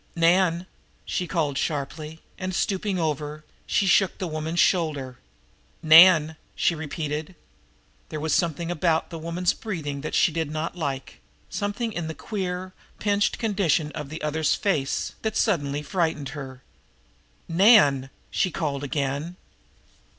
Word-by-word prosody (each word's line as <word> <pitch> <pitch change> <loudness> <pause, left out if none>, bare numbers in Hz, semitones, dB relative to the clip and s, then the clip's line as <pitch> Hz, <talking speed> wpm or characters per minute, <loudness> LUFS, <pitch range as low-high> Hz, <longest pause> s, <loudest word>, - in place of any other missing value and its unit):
"Nan!" 170 +1 +3 0.4
she 180 - -2
called 150 -6 -1
sharply; 150 +2 -4 0.2
and, 185 -1 -3
stooping 195 +1 -1
over, 150 -1 -3 0.2
shook 195 -1 +3
the 190 - -3
woman's 160 +1 -3
shoulder. 145 -8 +1 0.6
"Nan!" 160 -1 +7 0.2
she - - +2
repeated. 155 +1 -4 0.7
There 155 - -4
was 155 +1 -1
something 170 0 0
about 165 -1 0
the 165 - -6
woman's 170 +3 0
breathing 150 -10 -5
that 155 - -4
she - - +4
did 160 -1 -2
not 155 +3 -3
like, 140 -6 -4 0.3
something 210 +2 -2
in 175 -4 -3
the 160 - -5
queer, 185 -3 -4 0.2
pinched 205 -1 +1
condition 190 - +1
of 150 -3 -6
the 155 +1 -7
other's 155 0 +1
face 150 -10 -1
that 220 -1 -2
suddenly 145 -8 0
frightened 155 -3 -1
her. 135 -3 -8 0.8
"Nan!" 165 - +5 0.2
she 190 - +1
called 145 -4 -3
again. 145 +3 -2
160 Hz, 130 wpm, -25 LUFS, 150-185 Hz, 0.8 s, Nan